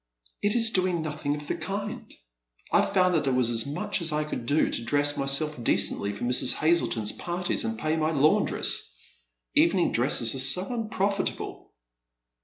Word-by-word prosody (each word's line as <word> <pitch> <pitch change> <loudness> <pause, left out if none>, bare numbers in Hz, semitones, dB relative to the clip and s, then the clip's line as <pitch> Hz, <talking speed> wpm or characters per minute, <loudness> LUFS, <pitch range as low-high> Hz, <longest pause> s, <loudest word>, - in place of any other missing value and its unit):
" - - -31
It 205 +2 +1
is 230 -1 +3
doing 185 -4 +1
nothing 150 -1 -3
of 150 0 -8
the - - -2
kind. 200 +2 -5 0.6
I - - +4
found 185 -1 +2
that 155 -4 +1
it 130 - +2
was 125 -2 +2
as 115 +2 -1
much 185 +6 -2
as 165 -1 -2
I 150 0 0
could 135 -6 -6
do 145 +4 +2
to - - -3
dress 145 +4 +2
myself 140 0 -1
decently 100 -2 0
for 100 - -7
Mrs. 125 +1 +3
Hazleton's 155 -10 +1
partieg 175 +1 -2
and 110 0 -3
pay 155 +6 -1
my 155 0 +1
laundress. 145 - +1 0.6
Evening - - +3
dresses 115 -1 +2
are 135 - -3
so 135 +8 +3
unprofitable." 205 -3 -3
150 Hz, 175 wpm, -27 LUFS, 130-180 Hz, 0.6 s, I